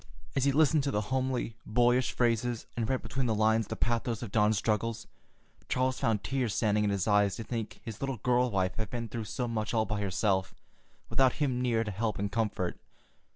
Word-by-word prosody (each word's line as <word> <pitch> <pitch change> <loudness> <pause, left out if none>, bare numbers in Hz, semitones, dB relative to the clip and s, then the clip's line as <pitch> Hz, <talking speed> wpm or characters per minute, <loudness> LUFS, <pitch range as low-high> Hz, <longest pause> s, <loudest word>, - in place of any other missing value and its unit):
As 135 - +2
he 140 - +4
listened 155 +1 +4
to - - +1
the 105 - 0
homely, 130 -3 -1
boyish 120 +2 +2
phrases 120 -1 0
and 115 -2 -1
read 130 -1 0
between 135 -2 -2
the 110 - +1
lines 110 0 +2
the - - -4
pathos 120 0 -1
of 110 - -6
Dawn's 105 0 +3
struggles, 115 +2 -1 0.6
Charles 130 0 +1
found 110 -3 +1
tears 130 -5 -1
standing 105 -2 +2
in 105 - +2
his 100 -1 -1
eyes 105 -2 +3
to 115 - -5
think 115 -2 -5
his 110 -3 -7
little 135 -2 -2
girl 125 +3 +2
wife 95 -3 0
had 110 -3 -3
been 115 -1 -4
through 115 0 -4
so 125 +4 -3
much 110 -1 -2
all 110 -1 +3
by 105 -2 -2
herself, 95 -1 0 0.5
without 130 -2 +3
him 130 -5 0
near 115 -3 +2
to 105 - -4
help 105 +1 -1
and 100 +1 -2
comfort. 105 -5 -1
115 Hz, 205 wpm, -30 LUFS, 105-125 Hz, 0.6 s, he